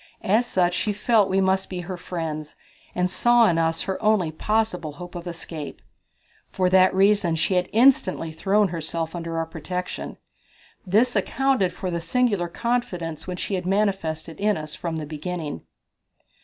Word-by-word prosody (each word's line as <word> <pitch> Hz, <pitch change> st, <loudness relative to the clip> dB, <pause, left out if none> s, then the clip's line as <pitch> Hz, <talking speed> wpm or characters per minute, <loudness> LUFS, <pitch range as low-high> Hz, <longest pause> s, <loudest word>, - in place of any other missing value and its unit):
As 220 Hz, +6 st, +2 dB
such 180 Hz, -1 st, +2 dB
she 210 Hz, +3 st, -1 dB
felt 210 Hz, 0 st, +3 dB
that -, -, -5 dB
we 195 Hz, +1 st, +3 dB
must 190 Hz, 0 st, +1 dB
be 180 Hz, -1 st, -4 dB
her 185 Hz, +2 st, -5 dB
friends, 165 Hz, -4 st, -5 dB, 0.4 s
and 180 Hz, 0 st, +2 dB
saw 240 Hz, +5 st, +4 dB
in 165 Hz, -3 st, +2 dB
us 165 Hz, 0 st, 0 dB
her 190 Hz, -, -3 dB
only 210 Hz, -7 st, +2 dB
possible 180 Hz, -3 st, -1 dB
hope 175 Hz, +3 st, -9 dB
of 175 Hz, 0 st, -7 dB
escape. 165 Hz, -3 st, -6 dB, 0.7 s
For 185 Hz, -1 st, 0 dB
that 185 Hz, 0 st, +6 dB
reason 195 Hz, -3 st, +3 dB
she 165 Hz, +4 st, 0 dB
had 180 Hz, 0 st, +1 dB
instantly 225 Hz, -, +3 dB
thrown 200 Hz, +5 st, +2 dB
herself 165 Hz, -1 st, -3 dB
under 165 Hz, -1 st, -4 dB
our 165 Hz, -, 0 dB
protection. 180 Hz, +3 st, -5 dB, 0.7 s
This 225 Hz, +7 st, +3 dB
accounted 230 Hz, -1 st, +1 dB
for 185 Hz, -2 st, -4 dB
the 170 Hz, -1 st, -2 dB
singular 210 Hz, -4 st, +1 dB
confidence 180 Hz, -7 st, -3 dB
which 180 Hz, -1 st, -4 dB
she -, -, -3 dB
had 180 Hz, -1 st, -2 dB
manifested 190 Hz, -5 st, -1 dB
in 210 Hz, +1 st, +2 dB
us 155 Hz, -1 st, -6 dB
from 170 Hz, -2 st, -4 dB
the 155 Hz, -1 st, -4 dB
beginning. 155 Hz, -, -5 dB
180 Hz, 170 wpm, -24 LUFS, 165-205 Hz, 0.7 s, that